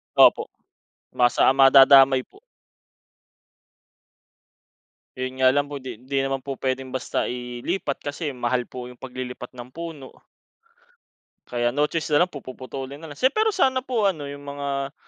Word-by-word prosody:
Opo. - - +6 0.7
Masa 120 -1 +3
madadamay 135 -1 +7
po. 405 - -22 2.8
Yun 130 0 -4
nga 130 - +7
lang 145 +2 +2
po 145 -1 -7
'di 125 -3 -7
'di 135 0 0
naman 135 -1 -3
po 140 - -3
puwedeng 130 0 -2
basta 130 - -2
ilipat 125 +6 -3
kasi 145 +2 -3
mahal 125 0 -1
po 125 -1 -7
yung 125 0 -13
paglilipat 125 -1 -7
ng 125 +1 -10
puno. 165 -5 -8 1.4
Kaya 120 0 0
no 150 +1 +1
choice 165 -1 -3
na 145 - +5
lang 180 - 0
po, 145 - -7
puputulin 130 +2 -8
na 160 - -9
lang. 145 - -11 0.2
Pero 435 +1 +2
sana 265 -8 +2
po 245 -5 0
ano, 175 -7 -1
yung 145 0 -10
mga 140 0 -4
135 Hz, 145 wpm, -24 LUFS, 130-145 Hz, 2.8 s, madadamay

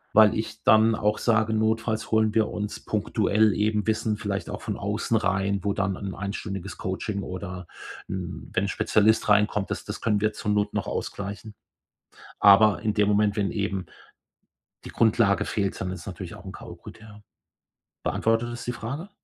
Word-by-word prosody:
weil 110 0 +7
ich 110 0 -5
dann 110 +1 +5
auch 105 0 +1
sage: 110 -1 +2
„Notfalls 110 0 0
holen 110 -1 +2
wir 110 -1 +3
uns 105 0 -4
punktuell 105 0 +2
eben 105 +1 0
Wissen, 110 0 +1
vielleicht 100 -3 -3
auch - - -6
von - - -4
außen - - 0
rein, 95 +1 0
wo 100 0 0
dann 95 -1 -1
'n 100 -1 -5
einstündiges 100 -1 -5
Coaching 100 +2 -3
oder 90 -1 -6 0.4
'n 95 -2 -5
wenn - - +1
'n - - -2
Spezialist 110 +3 +2
reinkommt, 105 -1 +2
das - - -4
das - - -6
können 105 -3 +1
wir 110 0 +2
zur 105 - -2
Not 105 0 +1
noch - - -1
ausgleichen.“ 100 +2 -5 0.9
Aber 100 +1 +6
in 105 - +1
dem 105 -1 +3
Moment, 105 0 +2
wenn 100 -2 0
eben 100 -2 -2 1.0
die - - -7
Grundlage 110 -3 +3
fehlt, 100 -2 -2
dann 90 - -2
ist 90 -2 -6
es - - -14
natürlich 90 -2 -7
auch - - -13
'n 95 - -7
KO-Kriterium. 105 +4 -12 0.8
Beantwortet 115 +1 +1
das 120 0 -6
die 120 - -2
Frage? 135 - -6
105 Hz, 175 wpm, -26 LUFS, 100-110 Hz, 1.0 s, weil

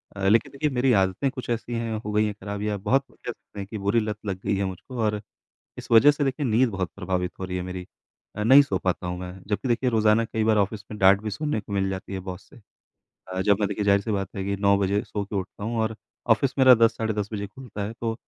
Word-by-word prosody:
अ, 95 -1 -1
लेकिन 115 +2 +3
देखिए 145 +2 -1
मेरी 125 +1 +3
आदतें 95 +9 0
कुछ 130 -3 -8
ऐसी 120 +1 -2
हैं 115 -1 -2
हो 105 - -3
गई 105 +1 +3
हैं 105 - -2
खराब 100 +1 -5
या 105 -1 -1
बहुत 115 +8 +1
कह 120 - -7
सकते 105 - -13
हैं 100 - -5
कि 110 - -4
बुरी 100 +3 +1
लत 105 -1 -3
लग 95 -2 -3
गई 100 - +1
है 100 - 0
मुझको 95 +7 -7
और 105 -1 -1 0.6
इस - - -8
वजह 115 +6 +8
से 145 0 -2
देखिए 140 +1 -1
नींद 120 +2 +3
बहुत 95 -5 -3
प्रभावित 90 -2 -2
हो 95 - -3
रही 90 0 -4
है 90 - -3
मेरी, 90 0 -6 0.5
नहीं 130 +7 +7
सो 125 -9 -1
पाता 90 -1 -2
हूँ 90 0 -3
मैं, 90 0 -6
जबकि 105 +4 -2
देखिए 120 +1 +1
रोज़ाना 110 0 +3
कई 110 0 -2
बार 110 -1 +3
ऑफिस 105 +1 0
में 105 - -6
डाँट 95 +1 +6
भी 110 - -3
सोने 150 +1 -2
को 100 - -8
मिल 95 -1 +1
जाती 95 0 -5
है 95 - -3
बॉस 95 0 -8
से। 120 - -17 0.7
अ, 95 - -2
जब 100 +1 +4
मैं 105 - +1
देखिए 105 - -2
जाहिर-सी 100 +2 +2
बात 100 -1 -1
है 95 - -3
कि 100 0 -1
9 100 0 +3
बजे 100 +1 +1
सो 100 -1 -4
के 100 0 -5
उठता 95 +1 -5
हूँ 115 +2 -2
और 110 0 -1 0.4
ऑफिस 135 +3 -2
मेरा 130 -1 +8
10 115 0 +3
साढ़े 110 -1 -1
10 105 -1 -2
बजे 100 -1 -3
खुलता 105 -1 -8
है 105 - -4
तो 115 -1 -1
105 Hz, 265 wpm, -25 LUFS, 95-115 Hz, 0.7 s, वजह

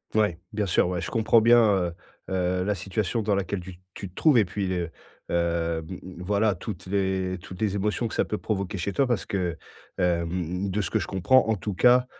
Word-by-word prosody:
Ouais. 105 -6 +2
Bien 105 -1 -1
sûr, 90 - +3
ouais. 90 -2 -2
Je - - -4
comprends 115 0 +4
bien, 120 +1 +7 0.3
heu 85 - -6 0.4
heu, 90 -1 0
la 105 +2 0
situation 95 +3 -2
dans 105 -1 +1
laquelle 100 0 -2
tu 90 0 -9 0.2
tu 95 - -7
te 90 - -25
trouves 150 -6 +4
et 105 - +5
puis 95 +2 -3
de, 90 -3 -1 0.4
heu 85 -1 0
mmh, 90 +1 -9
voilà, 100 +2 +2
toutes 90 -1 -7
les 95 -1 0
toutes 95 -1 -10
les 105 -2 0
émotions 105 +4 0
que - - -8
ça - - +3
peut 105 - -3
provoquer 100 -2 -2
chez 95 +3 -2
toi 140 -2 +2
parce 120 -3 0
que, 90 -4 -2 0.4
heu, 85 -1 +2
mmh 90 +2 -3
mh, - - -2
de 105 +2 0
ce - - -3
que - - +2
je - - -4
comprends, 110 +7 +3
en 110 - +3
tout 105 +1 -4
cas, 125 +7 +5
95 Hz, 230 wpm, -26 LUFS, 90-105 Hz, 0.4 s, bien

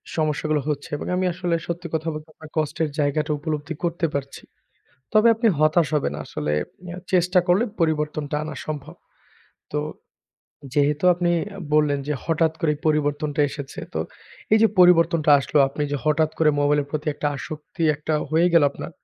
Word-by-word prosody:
সমস্যাগুলো 155 -1 0
হচ্ছে। 145 -1 -3
এবং - - -6
আমি 185 - 0
আসলে 175 -1 -1
সত্যি 170 0 -4
কথা 160 +1 -2
বলতে 155 +1 -8
আপনার 155 -1 -13
কষ্টের 155 0 0
জায়গাটা 150 +1 0
উপলব্ধি 155 +1 -3
করতে 170 0 0
পারছি। 140 -1 -5 0.7
তবে 215 +2 +5
আপনি 225 0 +2
হতাশ 155 +1 +3
হবে 145 - 0
না। - - -5
আসলে 75 0 -3 0.3
ইয়া 175 +1 -7
চেষ্টা 180 0 +3
করলে 195 +7 +4 0.2
পরিবর্তনটা 150 -2 0
আনা 155 - -5
সম্ভব। 150 -2 -6 0.8
তো 150 - +1 1.0
যেহেতু 150 +3 +2
আপনি 175 0 0 0.3
আ - - -10 0.2
বললেন 150 -2 +3
যে - - +1
হঠাৎ 160 0 +1
করে 155 - +2
এই - - -12
পরিবর্তনটা 150 -1 0
এসেছে। 140 -2 -7
তো - - 0 0.5
এই 220 - +7
যে 225 - +6
পরিবর্তনটা 165 -3 +5
আসলো 145 - 0
আপনি 150 +2 -4
যে - - +1
হঠাৎ 155 +1 +2
করে 155 -1 +5
মোবাইলের 145 0 +2
প্রতি 155 0 -4
একটা 145 - -3
আসক্তি 150 +5 -7
একটা 150 +2 -4 0.2
হয়ে 165 +3 +4
গেল 165 - +7
আপনার। 170 - -8
155 Hz, 170 wpm, -23 LUFS, 150-170 Hz, 1.0 s, এই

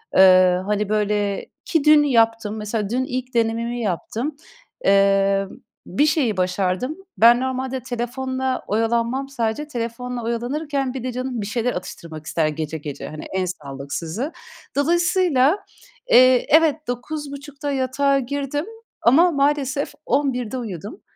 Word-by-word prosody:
eee, 185 -1 +6
hani 210 0 -1
böyle 210 -1 0 0.2
ki 325 -4 +1
dün 300 0 +6
yaptım, 225 -5 +2
mesela 210 -1 -3
dün 255 +2 0
ilk 255 -1 -4
denememi 230 +1 0
yaptım, 225 - -3 0.5
eee, 195 0 +3 0.4
bir 285 +12 +1
şeyi 255 - +1
başardım. 185 - 0 0.2
Ben 235 +2 +7
normalde 260 0 -2
telefonla 260 +1 -3
oyalanmam 235 +5 0
sadece, 240 +2 -2
telefonla 245 -1 -4
oyalanırken 265 +4 -2
bir 260 -2 -5
de 255 - -2
canım 250 -1 -3
bir - - -3
şeyler 235 +3 -1
atıştırmak 160 -3 -7
ister 160 0 0
gece 155 +1 -3
gece, 150 -2 -7
hani 155 0 -8
en 190 -1 0
sağlıksızı. 160 - -5 0.4
Dolayısıyla, 340 0 +3 0.5
eee, 255 0 +6
evet 315 0 +5
9:30'da 285 +3 -5
yatağa 275 +1 +1
girdim 285 +3 -3 0.4
ama 325 +9 +5
maalesef 285 -1 0
11'de 260 -3 0
uyudum 210 - -7
245 Hz, 125 wpm, -22 LUFS, 205-275 Hz, 0.5 s, Ben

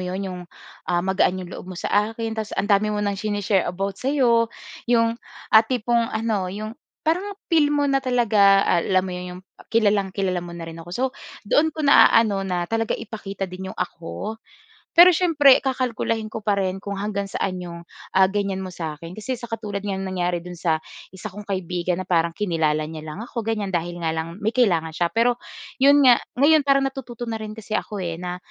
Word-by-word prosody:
‘yon, 185 +2 -3
‘yong, 185 -1 -5 0.5
ah, 175 0 +1
magaan 190 -1 +2
‘yong 185 -1 -7
loob 180 - -8
mo 185 - -7
sa - - -4
akin. 225 +2 0
Tapos, 220 -1 -5
ang - - +1
dami 200 +2 +3
mo 210 0 -1
ng 200 - 0
sini-share 205 -1 0
about 195 +2 -3
sa’yo. 245 -4 +3 0.4
‘Yong, 230 -1 +3 0.4
ah, 220 - +10
tipong, 235 -2 +1
ano, 215 -4 -1
‘yong 215 +3 -5 0.3
parang 390 +5 0
feel 300 -3 +4
mo 290 -1 +2
na 275 -1 +2
talaga, 215 -6 +4
alam 185 +2 +2
mo 185 - -5
‘yong, 180 0 -6 0.3
kilalang-kilala 195 -4 +1
mo 175 0 -8
na 170 - -6
rin 165 0 -8
ako. 165 - -12
So, 250 +8 0 0.4
doon 295 +9 +3
ko 310 - -2
na-aano, 220 -7 +5
na 175 -1 -1
talaga 225 +4 -1
ipakita 205 -3 -6
din 185 0 -7
‘yong - - -16
ako. 210 +6 -5 0.5
Pero 345 +2 +9
siyempre, 310 -6 +5
kakalkulahin 235 -4 -2
ko 220 -1 -7
pa 210 - +3
rin, 190 -1 -1
kung 200 +1 -6
hanggang 200 -1 -2
saan 190 -1 -3
'yong, 170 -1 -7 0.3
ah, 190 0 +5
ganyan 195 -1 -2
mo 185 - -5
sa 165 -3 -5
akin. 165 +5 -10
Kasi 235 +5 -3
sa 240 -1 -7
katulad 205 -3 -4
nga 195 -1 -3
no'ng 195 - -4
nangyari 180 -2 -1
do’n 180 0 -8
sa 170 -2 0 0.3
isa 190 +2 -9
kong 210 +1 -9
kaibigan, 180 -1 -2
na 185 - -4
parang 170 -2 +2
kinilala 160 -6 0
niya 155 0 -7
lang 150 - -7
ako, 240 -1 -4
ganyan, 210 -3 -2
dahil 175 +1 -2
nga 160 -1 0
lang 165 +2 -4
may 220 +2 -1
kailangan 170 -10 +2
siya. 170 +1 0
Pero 240 +2 +1 0.4
‘yon 280 +1 +7
nga, 245 -2 +7 0.2
ngayon, 300 +3 +5
parang 275 -1 +3
natututo 245 -3 -5
na 225 -1 -4
rin 215 0 -7
kasi 215 0 -7
ako, 210 -1 -2
eh, 170 0 -4
na 180 0 -4
200 Hz, 200 wpm, -23 LUFS, 180-230 Hz, 0.5 s, ah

